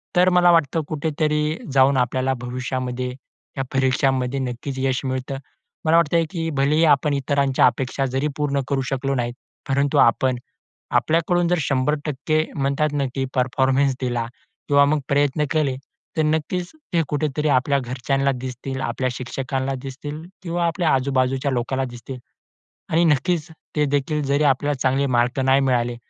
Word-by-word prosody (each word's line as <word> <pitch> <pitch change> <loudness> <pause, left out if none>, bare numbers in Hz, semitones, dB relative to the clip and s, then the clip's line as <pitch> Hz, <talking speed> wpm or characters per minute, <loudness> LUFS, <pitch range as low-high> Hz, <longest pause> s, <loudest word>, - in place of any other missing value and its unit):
तर 180 +1 +5
मला 180 -1 +5
वाटतं 165 -1 +2
कुठेतरी 155 0 0 0.2
जाऊन 135 0 +5
आपल्याला 130 +1 +1
भविष्यामध्ये 125 0 -3 0.5
या 135 - 0
परीक्षांमध्ये 130 0 +1
नक्कीच 130 +1 -4
यश 130 0 0
मिळतं. 130 +1 -3 0.5
मला 165 +1 +5
वाटत, 170 -1 +2 0.2
की 165 -3 -2
भलेही 150 +4 +3
आपण 145 0 +3
इतरांच्या 140 -1 +2
अपेक्षा 135 +1 -1
जरी 135 +3 -1
पूर्ण 140 -2 0
करू 140 -1 +1
शकलो 135 +1 -1
नाहीत, 120 -1 -1 0.4
परंतु 140 +1 +1
आपण 125 +2 +4 0.6
आपल्याकडून 170 +2 +1
जर 180 - +2
100% 150 +3 0
म्हणतात 140 +2 0
ना, 145 -1 0
की 135 -1 -1
परफॉर्मन्स 130 +1 +2
दिला 120 -2 -1 0.4
किंवा 140 -1 +5
मग 150 +1 +2
प्रयत्न 145 +1 +2
केले, 150 -5 +1 0.4
तर 155 - +4
नक्कीच 160 +3 -1 0.2
ते 165 - +4
कुठेतरी 150 0 -1
आपल्या 140 +1 +2
घरच्यांना 135 +2 0
दिसतील, 130 +1 -5
आपल्या 130 0 -1
शिक्षकांना 130 +2 -3
दिसतील 145 +3 -7 0.2
किंवा 170 -1 -1
आपल्या 170 -1 +1
आजूबाजूच्या 130 +1 +1
लोकांना 130 +2 -1
दिसतील. 120 +2 -8 0.7
आणि 170 +2 +3
नक्कीच 160 +1 +1 0.3
ते 150 -1 +2
देखील 145 +2 0
जरी 140 +2 +1
आपल्याला 145 +1 +2
चांगले 135 +2 +2
मार्क 120 +3 +1
नाही 135 +1 +4
मिळाले 120 -2 +1
135 Hz, 145 wpm, -22 LUFS, 130-150 Hz, 0.7 s, तर